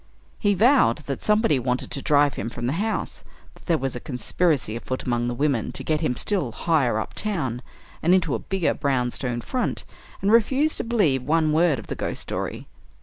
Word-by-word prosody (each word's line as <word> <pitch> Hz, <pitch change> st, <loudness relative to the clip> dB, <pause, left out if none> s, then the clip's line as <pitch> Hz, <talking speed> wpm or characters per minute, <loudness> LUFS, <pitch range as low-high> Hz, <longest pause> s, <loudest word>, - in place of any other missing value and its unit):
He 205 Hz, -1 st, +2 dB
vowed 215 Hz, -, +4 dB
that 140 Hz, -, -4 dB
somebody 210 Hz, -, +3 dB
wanted 125 Hz, +1 st, -2 dB
to 140 Hz, -, -3 dB
drive 145 Hz, -1 st, +3 dB
him 110 Hz, -, -4 dB
from 120 Hz, 0 st, -5 dB
the 130 Hz, -, 0 dB
house; 220 Hz, 0 st, -3 dB, 0.3 s
that -, -, -20 dB
there 170 Hz, -3 st, +3 dB
was 135 Hz, -3 st, -3 dB
a -, -, -4 dB
conspiracy 135 Hz, -1 st, -1 dB
afoot 130 Hz, +2 st, -4 dB
among 120 Hz, -1 st, 0 dB
the 120 Hz, -, -2 dB
women 140 Hz, -5 st, 0 dB
to -, -, -6 dB
get 155 Hz, 0 st, 0 dB
him 140 Hz, -6 st, 0 dB
still 180 Hz, -, -1 dB
higher 135 Hz, -4 st, +1 dB
up -, -, -5 dB
town, 145 Hz, -, -2 dB, 0.4 s
and 170 Hz, -, +2 dB
into 185 Hz, -2 st, +3 dB
a -, -, -1 dB
bigger 190 Hz, -3 st, 0 dB
brown 130 Hz, -3 st, 0 dB
stone 120 Hz, -2 st, -3 dB
front, 255 Hz, -, -2 dB, 0.3 s
and 200 Hz, -, +1 dB
refused 265 Hz, +7 st, +3 dB
to -, -, -1 dB
believe 200 Hz, -, +2 dB
one 155 Hz, +3 st, +1 dB
word 160 Hz, -2 st, +3 dB
of -, -, -8 dB
the -, -, -4 dB
ghost -, -, -4 dB
story. -, -, -4 dB
150 Hz, 205 wpm, -24 LUFS, 125-190 Hz, 0.4 s, vowed